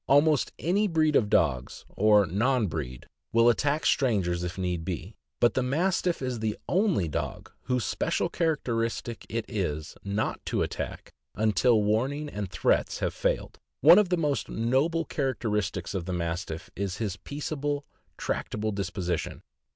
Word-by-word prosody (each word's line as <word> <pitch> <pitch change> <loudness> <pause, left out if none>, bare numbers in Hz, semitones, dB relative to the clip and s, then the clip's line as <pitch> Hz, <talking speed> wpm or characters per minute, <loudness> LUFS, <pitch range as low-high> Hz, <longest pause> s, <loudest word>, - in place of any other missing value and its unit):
Almost 145 0 +4
any 200 +6 +1
breed 155 -4 +2
of 105 -6 +3
dogs,* 65 -9 +1
or 105 -1 +4
non 110 +7 +1
breed, 70 -8 -5 0.3
will 115 +1 +5
attack 145 +5 +1
strangers 95 -9 +2
if 90 +1 -4
need 90 -3 -2
be, 90 +4 -5 0.2
but 120 - +4
the 130 - +1
Mastiff 170 +4 0
is 125 -2 -2
the 110 -1 -1
only 185 - +2
dog 75 - -4
whose 125 -4 0
special - - 0
characteristic 120 -8 -1
it 115 +1 -2
is 80 -7 -3
not 100 +2 -2
to - - +1
attack - - -5 0.2
until 110 +1 +3
warning 135 +8 0
and 100 -6 -4
threats - - +1
have - - -1
failed. - - -1 0.2
One 165 +8 +9
of 205 -4 +2
the 180 - +2
most 150 -4 0
noble 140 +9 +1
characteristics 105 - -2
of 95 -4 -3
the 90 - -3
Mastiff 85 -1 -3
is 95 -2 -3
his 100 -4 -3
peaceable, 145 +2 -3 0.3
tractable 110 0 -2
disposition. 90 -4 -3
115 Hz, 150 wpm, -28 LUFS, 95-145 Hz, 0.3 s, One